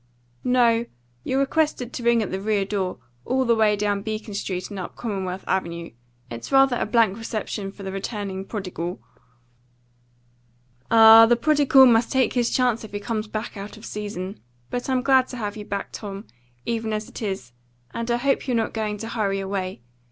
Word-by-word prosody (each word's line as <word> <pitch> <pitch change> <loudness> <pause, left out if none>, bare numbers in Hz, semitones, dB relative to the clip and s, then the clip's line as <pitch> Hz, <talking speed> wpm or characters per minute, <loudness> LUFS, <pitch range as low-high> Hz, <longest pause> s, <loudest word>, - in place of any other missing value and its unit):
"No; 235 -2 +3 0.4
you're 260 - -1
requested 275 -3 0
to - - -5
ring 235 -1 +3
at 200 - -5
the 190 +1 -3
rear 205 -1 +1
door, 190 -2 -2 0.3
all 260 +1 0
the 235 - +4
way 215 -2 +3
down 205 -1 0
Beacon 215 0 -5
Street 185 -2 -3
and 200 - -5
up 180 - -6
Commonwealth 190 -4 -4
Avenue. 170 -3 -2 0.4
It's 115 0 -7
rather 270 -2 +5
a - - -1
blank 220 -2 +2
reception 215 -3 -4
for 200 - -12
the 190 - -4
returning 195 -1 -4
prodigal." 185 -4 -5 1.9
"Ah, 225 0 +9
the 240 - +5
prodigal 280 0 +5
must 235 -1 +4
take 265 -2 +2
his 240 -2 +1
chance 245 -3 +1
if 215 - -10
he 205 - -2
comes 215 0 -3
back 215 +2 -5
out 205 +2 -8
of 215 - -12
season. 205 -2 -5 0.3
But 245 +1 -3
I'm 255 -1 +1
glad 265 -2 +4
to 250 - -7
have 210 -3 -4
you 210 -1 -7
back, 200 -1 -4
Tom, 200 0 -7 0.4
even 225 -1 -2
as 215 0 -3
it - - -10
is, 190 - -4 0.4
and 230 +1 -4
I 235 - +2
hope 275 +3 0
you're 250 -2 +1
not 225 - -1
going 215 -2 -2
to 225 - -6
hurry 205 -4 -1
away. 190 -6 -4
215 Hz, 190 wpm, -24 LUFS, 195-240 Hz, 1.9 s, Ah